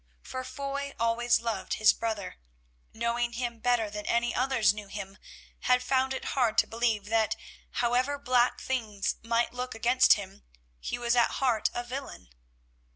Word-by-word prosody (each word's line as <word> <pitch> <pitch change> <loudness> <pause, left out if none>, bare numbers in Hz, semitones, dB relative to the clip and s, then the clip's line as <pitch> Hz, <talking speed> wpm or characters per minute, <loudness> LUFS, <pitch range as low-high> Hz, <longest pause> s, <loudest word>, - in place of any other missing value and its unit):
For 255 0 -5
Foy 280 +2 -5
always 230 +1 +2
loved 230 -1 -2
his 215 - +5
brother, 220 - -4 0.5
and - - -17
knowing 235 +1 0
him 235 -1 -3
better 240 -1 +2
than 210 0 -7
any 235 0 +1
others 255 -5 +3
knew 210 -1 -8
him, 195 0 -7 0.4
had 250 0 +2
found 260 +1 +1
it - - -6
hard 240 -5 +1
to - - +5
believe 225 -3 0
that 220 -1 +2 0.5
however 255 +4 +1
black 250 -3 +2
things 220 -6 -2
might 230 +1 0
look 250 -1 -4
against 245 +3 +5
him, 195 -1 -6 0.4
he - - -4
was 240 0 +1
at 240 -1 +3
heart 245 -5 +2
a 240 - -2
villain. 255 - -7
235 Hz, 160 wpm, -29 LUFS, 220-255 Hz, 0.5 s, his